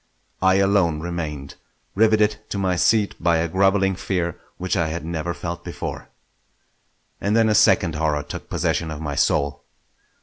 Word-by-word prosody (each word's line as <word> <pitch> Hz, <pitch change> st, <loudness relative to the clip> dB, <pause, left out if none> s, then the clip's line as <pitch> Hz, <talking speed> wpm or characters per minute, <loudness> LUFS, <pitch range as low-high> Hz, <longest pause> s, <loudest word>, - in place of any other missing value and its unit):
I 95 Hz, 0 st, +4 dB
alone 95 Hz, -5 st, +2 dB
remained, 80 Hz, -5 st, -5 dB, 0.4 s
riveted 110 Hz, 0 st, +3 dB
to -, -, -3 dB
my 95 Hz, -2 st, 0 dB
seat 105 Hz, +3 st, +2 dB
by 85 Hz, -1 st, +3 dB
a 80 Hz, +1 st, 0 dB
grovelling 95 Hz, +2 st, +2 dB
fear 90 Hz, -3 st, -2 dB, 0.2 s
which 95 Hz, +1 st, -2 dB
I 85 Hz, -4 st, +1 dB
had 80 Hz, +1 st, -4 dB
never 85 Hz, 0 st, -3 dB
felt 85 Hz, +2 st, -5 dB
before. -, -, -6 dB, 1.1 s
And 105 Hz, +2 st, 0 dB
then 115 Hz, -1 st, +4 dB
a -, -, +3 dB
second 100 Hz, -6 st, +4 dB
horror 75 Hz, -1 st, 0 dB
took 75 Hz, -, -8 dB
possession 85 Hz, -, -1 dB
of 80 Hz, -1 st, -6 dB
my 75 Hz, -2 st, -4 dB
soul. 70 Hz, 0 st, 0 dB
85 Hz, 160 wpm, -22 LUFS, 80-100 Hz, 1.1 s, I